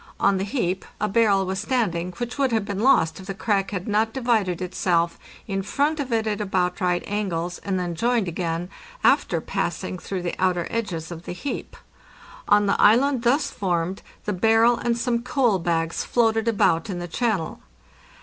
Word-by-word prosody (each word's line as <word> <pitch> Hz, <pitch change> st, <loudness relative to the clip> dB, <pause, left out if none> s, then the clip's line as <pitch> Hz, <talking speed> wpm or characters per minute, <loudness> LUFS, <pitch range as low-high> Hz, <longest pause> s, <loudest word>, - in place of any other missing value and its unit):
On 200 Hz, -1 st, +3 dB
the 190 Hz, -, -1 dB
heap 195 Hz, -4 st, -1 dB, 0.2 s
a 210 Hz, -, +1 dB
barrel 200 Hz, -2 st, +3 dB
was 190 Hz, +1 st, -2 dB
stand 225 Hz, -4 st, 0 dB
ing, 170 Hz, +2 st, -4 dB
which 240 Hz, +6 st, -5 dB
would 270 Hz, -2 st, +2 dB
have 220 Hz, -3 st, +1 dB
been 200 Hz, -1 st, -4 dB
lost 205 Hz, -10 st, +3 dB
if 190 Hz, -, -11 dB
the 195 Hz, -, -4 dB
crack 195 Hz, -1 st, 0 dB
had 185 Hz, -2 st, -4 dB
not 220 Hz, +1 st, +1 dB
divided 225 Hz, -9 st, +1 dB
itself 175 Hz, -2 st, 0 dB, 0.3 s
in 195 Hz, -2 st, -1 dB
front 290 Hz, +9 st, 0 dB
of 270 Hz, -3 st, -3 dB
it 225 Hz, -1 st, +1 dB
at 210 Hz, -1 st, -1 dB
about 185 Hz, -3 st, -1 dB
right 180 Hz, -1 st, +1 dB
angles 180 Hz, -4 st, -2 dB
and 190 Hz, -2 st, -2 dB
then 175 Hz, -1 st, -2 dB
joined 230 Hz, +2 st, +1 dB
again, 170 Hz, +1 st, -3 dB, 0.3 s
after -, -, +3 dB
passing 185 Hz, -, -3 dB
through 185 Hz, -1 st, -4 dB
the 175 Hz, -, -2 dB
outer 180 Hz, -2 st, +1 dB
edges 180 Hz, -8 st, -3 dB
of 170 Hz, 0 st, -8 dB
the -, -, -5 dB
heap. 280 Hz, +10 st, -5 dB, 0.7 s
On 205 Hz, 0 st, +5 dB
the 200 Hz, -, +1 dB
island 250 Hz, +4 st, +5 dB
thus 265 Hz, +5 st, +2 dB
formed 180 Hz, -1 st, -1 dB, 0.2 s
the 210 Hz, -, -1 dB
barrel 225 Hz, +5 st, +4 dB
and 235 Hz, 0 st, -1 dB
some 235 Hz, 0 st, 0 dB
coal 240 Hz, -6 st, +1 dB
bags 165 Hz, -1 st, -1 dB
floated 225 Hz, -1 st, +1 dB
about 180 Hz, -6 st, +2 dB
in 185 Hz, -, -3 dB
the 175 Hz, 0 st, -5 dB
channel. 200 Hz, -3 st, -1 dB
195 Hz, 190 wpm, -24 LUFS, 180-230 Hz, 0.7 s, On